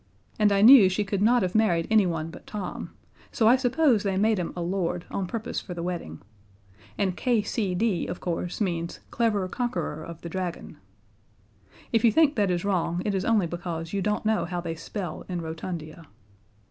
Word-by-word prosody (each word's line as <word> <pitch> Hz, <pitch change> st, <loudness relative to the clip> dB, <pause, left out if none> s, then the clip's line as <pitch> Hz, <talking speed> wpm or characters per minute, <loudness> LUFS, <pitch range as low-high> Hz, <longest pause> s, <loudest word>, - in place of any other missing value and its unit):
and 210 Hz, -1 st, +4 dB
I 200 Hz, 0 st, +3 dB
knew 230 Hz, -5 st, +9 dB
she 190 Hz, +3 st, 0 dB
could 200 Hz, -1 st, -2 dB
not 235 Hz, +1 st, +4 dB
have 180 Hz, 0 st, -1 dB
married 180 Hz, -7 st, +2 dB
anyone 170 Hz, -7 st, +2 dB
but -, -, -13 dB
Tom, 205 Hz, -3 st, -5 dB, 0.4 s
so 220 Hz, -, +2 dB
I 240 Hz, -, +7 dB
suppose 260 Hz, -2 st, +2 dB
they 195 Hz, -2 st, -1 dB
made 215 Hz, 0 st, +2 dB
him 175 Hz, -, -3 dB
a 175 Hz, -, -4 dB
Lord 175 Hz, -1 st, -2 dB
on 190 Hz, -2 st, -2 dB
purpose 230 Hz, +4 st, -4 dB
for 180 Hz, -, -8 dB
the 170 Hz, -, -4 dB
wedding 170 Hz, -, -5 dB, 0.8 s
and 190 Hz, -3 st, 0 dB
K.C.D., 210 Hz, -4 st, 0 dB
of 180 Hz, -, -5 dB
course, 175 Hz, 0 st, -3 dB
means 170 Hz, -4 st, -2 dB
Clever 215 Hz, -5 st, +1 dB
Conqueror 240 Hz, -6 st, -3 dB
of 170 Hz, 0 st, -9 dB
the 170 Hz, -, -5 dB
Dragon. 180 Hz, -2 st, -5 dB, 1.2 s
If 225 Hz, 0 st, +3 dB
you 230 Hz, -, +6 dB
think 305 Hz, +4 st, +4 dB
that 205 Hz, -4 st, +2 dB
is 175 Hz, +1 st, -1 dB
wrong 175 Hz, -3 st, 0 dB
it 205 Hz, -, 0 dB
is 190 Hz, -1 st, -1 dB
only 220 Hz, -5 st, +3 dB
because 170 Hz, 0 st, -5 dB
you 200 Hz, -, 0 dB
don't 210 Hz, +2 st, -1 dB
know 220 Hz, -1 st, +1 dB
how 175 Hz, 0 st, -3 dB
they 170 Hz, -1 st, -4 dB
spell 175 Hz, +4 st, -6 dB
in 180 Hz, -1 st, -2 dB
Rotundia. 160 Hz, -1 st, -6 dB
190 Hz, 185 wpm, -26 LUFS, 175-220 Hz, 1.2 s, knew